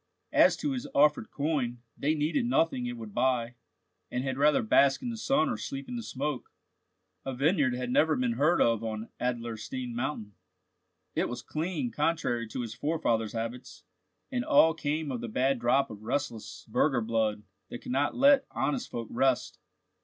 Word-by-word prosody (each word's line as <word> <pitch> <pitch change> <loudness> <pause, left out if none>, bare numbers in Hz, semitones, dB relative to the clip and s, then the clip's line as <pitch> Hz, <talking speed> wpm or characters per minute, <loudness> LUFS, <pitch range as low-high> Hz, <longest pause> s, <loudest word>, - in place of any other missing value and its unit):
As - - +5
to 295 - -2
his 255 -2 -3
offered 150 -5 +4
coin, 135 -5 -2
they 150 +3 0
needed 160 - 0
nothing 160 - +1
it 120 0 -5
would 110 -3 -9
buy, 125 -1 +1 0.6
and 125 +1 -2
had 135 -1 -2
rather 145 -1 +3
bask 135 +5 +4
in 245 - -2
the - - -4
sun 275 +5 +2
or 250 - -1
sleep 275 -1 -6
in 250 - -5
the 235 - -3
smoke. 145 - -4 0.7
A 135 -1 -4
vineyard 140 -2 +2
had 125 0 -3
never 155 +4 +3
been 125 -1 0
heard 145 +9 +2
of 115 -1 +1
on 110 0 -4
Adlerstein 120 0 -3
mountain: 115 -4 -3 0.8
it - - 0
was 120 - -6
clean 185 - -3
contrary 120 - 0
to 115 - -4
his 115 -2 -5
forefathers' 120 -8 -1
habits; 115 +2 -6 0.5
and 245 -2 -1
all 285 - +5
came 150 -1 -2
of 125 -3 -3
the 120 - -4
bad 130 +3 +1
drop 120 +3 +2
of 105 -1 -9
restless 110 -6 -4
burgher 125 +3 +2
blood, 110 -2 0 0.3
that 120 - -8
could - - -6
not 140 +3 +1
let 275 +1 +5
honest 255 -2 -2
folk 115 -2 -5
rest. 130 +1 +1
130 Hz, 175 wpm, -29 LUFS, 115-160 Hz, 0.8 s, As